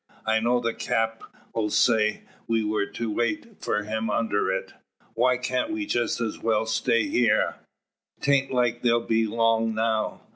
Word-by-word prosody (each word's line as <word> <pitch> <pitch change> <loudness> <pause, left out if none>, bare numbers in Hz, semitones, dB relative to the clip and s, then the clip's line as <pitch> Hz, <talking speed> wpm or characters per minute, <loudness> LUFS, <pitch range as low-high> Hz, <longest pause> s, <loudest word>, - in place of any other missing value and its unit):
I 110 0 +2
know 120 +2 +2
the 115 -1 -1
Cap' 110 0 -1 0.5
sayed 110 0 +2 0.3
we 115 -1 +1
were 105 -1 0
to 115 -2 -4
wait 155 - -3
for 105 - 0
them 110 +1 -2
under 105 -1 0
it. - - -3 0.4
Why 125 +2 +2
cant 125 - -1
we 325 -1 -2
just 120 - 0
as 115 -3 -3
well 110 -1 +1
stay 110 +1 +1
heer? 120 -3 +2 0.6
'Taint 140 -1 +2
like 120 -2 +1
they'll 120 -1 +2
be 115 0 +2
long 115 0 +1
now. 110 -1 -1
115 Hz, 155 wpm, -25 LUFS, 110-120 Hz, 0.6 s, I